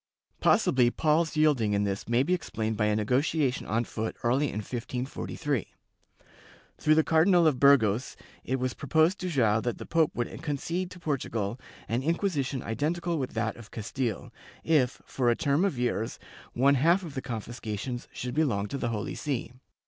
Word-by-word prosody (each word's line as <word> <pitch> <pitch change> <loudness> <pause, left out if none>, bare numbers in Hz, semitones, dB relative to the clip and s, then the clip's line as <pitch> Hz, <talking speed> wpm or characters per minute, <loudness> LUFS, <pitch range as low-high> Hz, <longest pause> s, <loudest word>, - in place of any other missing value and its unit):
^ - - -44
Possibly 125 -2 +4
Paul's 160 +5 +1
yielding 140 -9 +3
in 100 0 +2
this 100 +2 -3
may 120 +2 +3
be 180 - +1
explained 110 -10 -2
by 105 - +1
a 105 - +2
nego 110 +4 +2
tiation 145 -4 -1
on 115 +2 +1
foot 110 -1 -4
early 130 +5 +2
in - - -6
1543. 125 +4 -3 1.1
Through 155 0 +4
the 160 - +4
Cardinal 170 +2 +4
of 145 -5 +3
Burgos, 130 -4 +4 0.3
it 130 0 -1
was 130 0 -1
proposed 160 +6 +2
to 185 - -3
Joao 115 -8 +2
that 120 0 -2
the - - -8
pope 165 -2 +2
would 120 - -4
concede 165 +4 -2
to 180 - -11
Portugal 120 - -2 0.3
an 115 +3 0
Inquisition 150 -4 -1
identical 165 +8 -1
with 130 -3 -4
that 110 0 -1
of 115 -3 -12
Castile, 115 0 -4 0.3
if, 145 -7 +1
for 125 -3 0
a 120 - +3
term 150 0 +1
of 195 -10 0
years, 120 -2 -1 0.4
one 135 +3 +4
half 170 +8 +3
of 160 -5 -7
the 135 - -3
confiscations 120 0 -5
should 125 0 -5
belong 125 -10 +1
to 140 - -4
the 120 - -1
Holy 110 -2 -3
See. 130 -5 -3
130 Hz, 180 wpm, -28 LUFS, 115-155 Hz, 1.1 s, Possibly